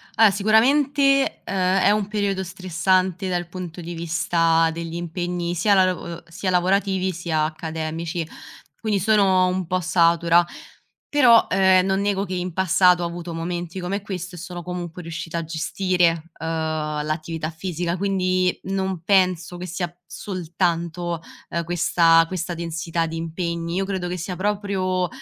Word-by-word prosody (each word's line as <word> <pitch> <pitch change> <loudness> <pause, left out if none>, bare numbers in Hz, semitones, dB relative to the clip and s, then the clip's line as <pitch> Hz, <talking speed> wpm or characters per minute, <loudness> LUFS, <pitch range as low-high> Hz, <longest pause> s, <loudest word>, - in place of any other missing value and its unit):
Ah, 220 -3 +6
sicuramente, 275 +7 +3
uhm, - - -3
è 190 +1 +3
un 210 -1 +1
periodo 200 -2 -1
stressante 185 0 0
dal 175 -1 -1
punto 180 -1 -7
di 175 0 -6
vista 165 0 +2
degli 165 0 -6
impegni, 175 0 -3
sia 200 +5 +3
la 190 -1 +5
lav 185 -1 0
uhm, 170 -1 -8
sia 185 +3 -4
lavorativi, 190 +1 +1
sia 165 -3 -1
accademici, 160 +1 -4 0.5
quindi 210 -3 0
sono 190 -2 +4
un 185 0 -1
po' 185 +2 0
satura, 170 -1 +3 0.6
però, 245 -6 +6
ehm, 190 -1 +4
non 190 +1 +1
nego 200 -1 0
che 185 -1 -4
in 180 -1 -3
passato 180 0 +4
ho - - 0
avuto 170 0 -6
momenti 175 +2 -4
come 190 +3 -3
questo 185 -3 -6
e - - -9
sono 175 0 -7
comunque 180 -1 -6
riuscita 165 0 -5
a 165 - -4
gestire, 170 0 0
uhm, - - -5 0.6
l'attività 155 +1 -3
fisica, 175 +1 -3
quindi 185 -1 +1
non 190 -2 -2
penso 180 -2 +2
che 180 - -6
sia 175 -1 -3
soltanto, 175 -2 -2 0.3
ehm, 170 - -2
questa 165 -1 +4
questa 180 0 -3
densità 165 0 -2
di 165 - -6
impegni, 170 +1 -3
io 195 +1 0
credo 190 -2 -3
che 180 +1 -3
sia 180 +2 -4
proprio, 190 -2 -1
180 Hz, 150 wpm, -23 LUFS, 170-190 Hz, 0.6 s, Ah